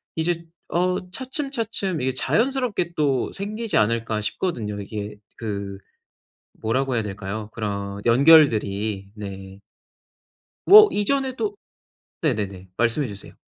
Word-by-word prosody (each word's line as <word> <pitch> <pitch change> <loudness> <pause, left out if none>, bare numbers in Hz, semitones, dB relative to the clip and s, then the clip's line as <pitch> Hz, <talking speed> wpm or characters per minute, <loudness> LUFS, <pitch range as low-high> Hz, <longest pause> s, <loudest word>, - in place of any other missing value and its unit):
이제 170 +1 -1 0.2
어 180 +1 0
'차츰차츰 230 - -2
이게 130 +1 0
자연스럽게 230 - 0
또 140 -4 +1
생기지 215 +3 -3
않을까?' 110 0 +1
싶거든요. 105 - -3
이게 105 +1 -6 0.2
그 100 -3 -5 0.8
뭐라고 130 +4 0
해야 115 - +1
될까요? 105 +1 -5
그런 100 -2 -4
연결들이 110 -7 +4
네. 95 -2 -8 1.1
뭐 425 +2 +10
이전에도 270 - 0 0.7
네네네. 100 - -2
말씀해 120 +5 +1
주세요. 100 -1 -9
120 Hz, 255 characters per minute, -23 LUFS, -, 1.1 s, 뭐